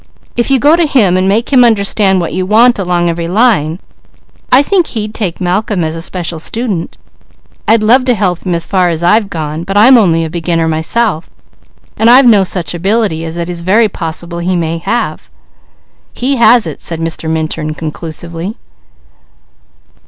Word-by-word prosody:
If 240 +2 -1
you 270 - +4
go 295 +5 +4
to 340 -2 +1
him 215 -11 +2
and 185 +1 +1
make 225 +7 0
him 250 -2 +6
understand 200 -3 +2
what 170 - -3
you 185 - -1
want 225 +4 +3
along 175 -2 0
every 170 0 -3
line, 180 -5 +1 0.7
I 260 +3 +5
think 360 +1 +1
he'd 215 -2 -4
take 190 -7 -4
Malcolm 185 +1 -1
as 160 0 -3
a 165 - -6
special 170 -2 -4
student. 205 -2 -3 0.7
I'd 225 0 +3
love 250 +4 +3
to 250 -2 +2
help 185 -4 -1
him 180 -2 -3
as 170 0 +1
far 185 -2 +1
as 165 0 -3
I've 205 +3 +2
gone, 155 -2 -5
but 195 +3 -3
I'm 240 +4 +6
only 165 -6 +1
a - - -5
beginner 165 -1 -1
myself, 160 +3 -1 0.7
and 225 - +3
I've 255 +2 +6
no 215 -5 +5
such 175 -5 -3
ability 190 -2 -1
as 165 +1 -6
it 170 -1 -3
is 175 -1 -5
very 210 +6 +2
possible 170 -1 -5
he 180 +2 -1
may 165 -1 -2
have." 215 +8 -3 0.8
"He 270 +2 -1
has 235 -1 +4
it," 155 -3 -7
said 165 -1 0
Mr. 165 0 -3
Minturn 155 -1 -3
conclusively. 165 +4 -6
185 Hz, 180 wpm, -12 LUFS, 165-225 Hz, 0.8 s, him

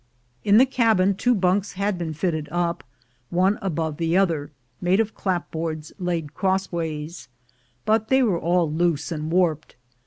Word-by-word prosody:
In 205 0 +5
the 255 - +7
cabin 225 -7 +3
two 245 +6 +2
bunks 190 +1 +1
had 200 -1 -1
been 160 -2 -3
fitted 155 -2 -2
up, 175 -1 -1 0.5
one 185 +4 +2
aboA'e 160 -5 -2
the 165 +1 +1
other, 165 -7 +1 0.3
made 180 +3 +2
of 220 -1 0
clapboards 160 -4 -3
laid 170 -5 -2
crossways, 170 -4 -2 0.6
but 220 0 +2
they 265 +1 +4
were 195 -8 +1
all 170 -2 +1
loose 160 -1 0
and 155 0 -3
warped. 165 -4 +1
175 Hz, 150 wpm, -24 LUFS, 160-195 Hz, 0.6 s, the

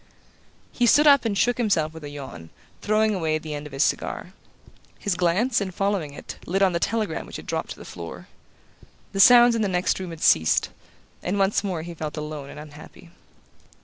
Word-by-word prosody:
He 245 - +1
stood 295 +6 +5
up 280 -4 +6
and 205 -3 0
shook 245 +4 +1
himself 170 -9 +1
with 160 -1 -11
a 145 - -6
yawn, 130 - -9 0.3
throwing 215 +1 +2
away 160 -5 0
the 155 -1 -7
end 145 0 -6
of - - -14
his 135 +2 +1
cigar. - - -2 0.6
His 205 - -1
glance, 190 +8 +1
in 195 - -2
following 190 -5 -2
it, - - -9
lit 195 +3 +1
on 190 -2 +3
the 170 - 0
telegram 220 +3 -2
which - - -10
had - - -7
dropped - - -3
to - - -6
the - - -11
floor. - - -9 0.8
The 195 - -4
sounds 240 +3 +8
in 230 - 0
the 210 - +1
next 180 0 0
room 185 -2 -5
had 165 -2 -8
ceased, 80 0 +3 0.5
and 185 +3 -2
once 195 +1 +2
more 180 -5 -3
he 170 +1 -7
felt 155 -1 -6
alone 150 -2 -6
and - - -10
unhappy. 150 +3 -13
180 Hz, 205 wpm, -24 LUFS, 155-210 Hz, 0.8 s, sounds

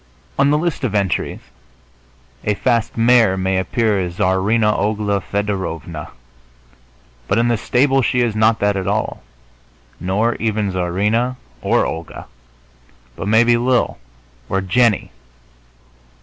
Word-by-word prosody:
On 140 - +4
the 150 - +3
list 160 -2 -2
of 110 -5 -1
entries 100 -3 -1 1.0
a 105 - 0
fast 115 0 0
mare 115 -4 +4
may 95 0 0
appear 105 +2 0
as 90 -2 -3
Czarina 105 +4 +2
Ogla 105 -1 0
Fedorovna, 95 -7 -4 1.2
but 100 - +1
in 120 +1 +2
the 120 - +2
stable 135 +4 +2
she 125 0 +1
is 115 -3 0
not 110 +1 +3
that 100 0 +2
at 95 -1 -3
all, 105 +2 -2 0.8
nor 105 +6 0
even 110 -3 -1
Czarina 105 +8 0 0.3
or - - +2
Olga, 80 0 -6 0.9
but - - -5
maybe 120 +2 +4
Lil 125 - +1 0.5
or 95 - +1
Jennie. 105 +3 +1
105 Hz, 125 wpm, -19 LUFS, 95-120 Hz, 1.2 s, On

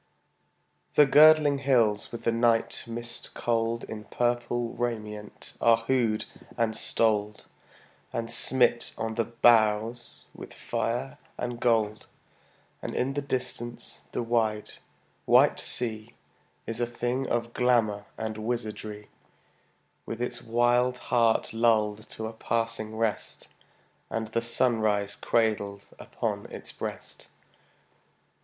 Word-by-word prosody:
The 150 - +7
girdling 150 0 +6
hills 115 -7 +2
with 120 - -7
the 115 - +2
night 115 0 +1
mist 120 0 -4
cold 115 0 -1
In 105 -1 -8
purple 120 0 -1
raiment 105 -3 -5
are 115 -1 +5
hooded 115 -2 0 0.3
and 115 -2 0
stoled 105 -2 0 0.7
And 115 0 -3
smit 120 -1 +4
on 110 0 -3
the 115 0 0
brows 115 0 +2
with - - -11
fire 125 +3 -3 0.2
and 120 -1 -4
gold; 110 -3 +1 0.7
And - - -5
in 135 +2 0
the 145 - -2
distance 125 -3 -4
the - - -2
wide, 110 -2 0 0.5
white - - +5
sea 110 -2 -3 0.5
Is 115 +1 -4
a 120 - 0
thing 120 +2 -2
of 120 0 -1
glamor 115 -5 +1
and 110 0 -4
wizardry, 110 -2 -4 1.0
With 115 - -5
its 120 0 -3
wild 120 +2 +2 0.2
heart 115 -2 +3
lulled 110 -2 +1
to 110 - -6
a 110 - -5
passing 115 -1 -2
rest, 110 -2 -3 0.6
And 110 -1 -3
the 115 - -1
sunrise 110 -4 +2
cradled 100 -3 0
upon - - -4
its - - -7
breast. - - -7
115 Hz, 115 wpm, -27 LUFS, 110-120 Hz, 1.0 s, The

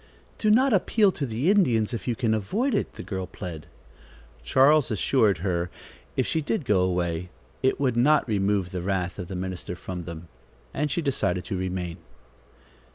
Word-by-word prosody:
"Do 215 - +2
not 255 +4 +5
appeal 205 +1 +3
to 145 -6 -3
the 125 - +1
Indians, 125 - +2
if 115 - -5
you 120 - +1
can 115 -2 +1
avoid 205 - 0
it," 210 - -1
the - - -7
girl 95 -2 -4
plead. 85 -6 -8 0.8
Charles 135 - +4
assured 110 -1 +2
her 85 -2 0 0.5
if - - +2
she 160 - 0
did 155 +2 -2
go 105 -5 +3
away, 90 -1 0 0.3
it 130 - +1
would 130 -4 +1
not 145 +5 +4
remove 100 -3 0
the 90 - -3
wrath 95 -1 -2
of 90 - -5
the 95 - -6
minister 90 -1 -4
from 90 0 -6
them, 85 0 -8 0.5
and 150 +2 -1
she 165 +4 -1
decided 90 -10 0
to - - -3
remain. 90 -2 -3
105 Hz, 175 wpm, -26 LUFS, 90-140 Hz, 0.8 s, not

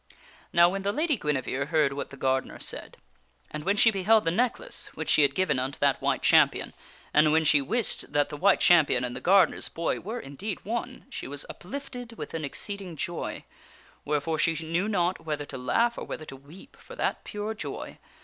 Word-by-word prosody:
Now 170 0 +6
when 195 +2 -2
the 200 +1 0
Lady 305 +4 +1
Guinevere 140 - -2
heard 150 -3 +2
what 140 - -5
the 140 - -11
gardener 130 0 0
said, - - -7 0.5
and 150 0 -5
when 200 +4 +1
she 225 - +6
beheld 210 +1 +3
the 165 - +2
necklace 250 - -1
which - - -4
she - - +5
had 140 -1 +3
given 170 -8 +1
unto 130 +2 -3
that - - +2
White - - 0
Champion, - - +4 0.4
and 150 0 +5
when 160 +1 +4
she 145 -1 +5
wist 225 - -2
that 145 0 +2
the 150 - -6
White 190 +6 +4
Champion 155 -8 +5
and 125 0 -3
the - - -6
gardener's 185 -2 +4
boy 165 0 -2
were 225 +6 -5
indeed 180 +6 -6
one, 240 +4 -4
she - - -6
was 145 +1 -5
uplifted 245 +2 -8
with - - -8
an 165 -1 -3
exceeding 190 +4 -5
joy; 170 +3 -4 0.6
wherefore 150 +2 -1
she 165 +1 +2
knew 175 +6 0
not 180 -4 0
whether 150 -2 -3
to 140 - -9
laugh 235 - +1
or - - -5
whether 155 - -6
to 135 - -9
weep 155 - -15
for - - -12
that - - -1
pure 210 +1 -4
joy. 220 - -7
170 Hz, 200 wpm, -27 LUFS, 145-210 Hz, 0.6 s, Now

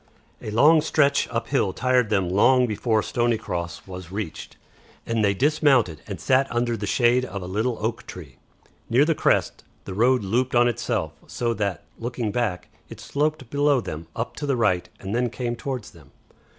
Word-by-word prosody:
A - - -6
long 150 +9 +5
stretch 140 -2 +2
up 115 -1 -3
hill 115 -9 +1
tired 125 -1 +2
them 100 -4 +1
long 125 +8 +4
before 110 -1 0
Stoney 120 -1 0
Cross 85 -7 -5
was 90 -2 -9
reached, 100 -5 -6 0.5
and 115 -1 0
they 100 -1 +2
dismounted 135 - +2
and - - -6
sat 135 +1 +2
under 120 0 0
the 105 -2 -4
shade 120 +3 +3
of 100 -4 -5
a - - -6
little 110 +6 -1
oak 115 +2 -3
tree. 75 -8 -10 0.5
Near 130 +5 +4
the 165 - +2
crest - - +1 0.2
the 95 - -6
road 125 +4 +3
looped 120 +6 0
on 120 0 +5
itself, 115 -8 -2
so 120 -1 -1
that, 100 -6 -2 0.2
looking 120 -2 -3
back, 115 -7 -2 0.2
it - - -10
sloped 145 -4 -2
below 145 -1 +3
them 80 -7 -6
up 115 - -4
to 145 - -4
the 135 -2 +1
right 95 -6 +1
and 95 +1 -5
then 120 +1 +1
came 120 0 -3
towards 125 -3 -5
them. 75 -5 -18
115 Hz, 185 wpm, -24 LUFS, 100-125 Hz, 0.5 s, long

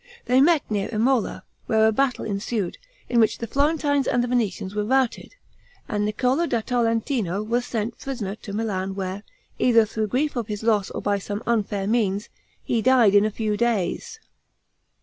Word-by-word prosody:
They 255 +1 +4
met 320 0 +4
near 205 -2 -2
Imola, 235 +2 0 0.2
where 220 0 +3
a 220 - +4
battle 255 +3 0
ensued, 200 -2 -3 0.3
in 240 - +2
which 220 - +3
the 230 - -4
Florentines 285 +1 +1
and 245 0 +2
Venetians 215 -6 -1
were 210 0 -1
routed, 260 - 0 0.5
and 210 -1 -1
Niccolo 255 +10 +1
da 235 -6 0
Tolentino 225 - 0
was 240 +3 -1
sent 225 0 -3
prisoner 235 -8 -4
to 210 -1 -10
Milan 195 -3 -2
where, 190 0 -4 0.4
either 230 -3 +5
through 215 0 -2
grief 280 +7 0
for 240 - -2
his 210 0 -6
loss 215 -3 +2
or - - -6
by 205 -1 +1
some 205 +2 -5
unfair 210 -4 0
means, 210 -1 0 0.3
he 230 - 0
died 240 -4 +5
in 205 0 +5
a - - +1
few 215 0 -2
days. 235 - -1
225 Hz, 170 wpm, -24 LUFS, 205-245 Hz, 0.5 s, either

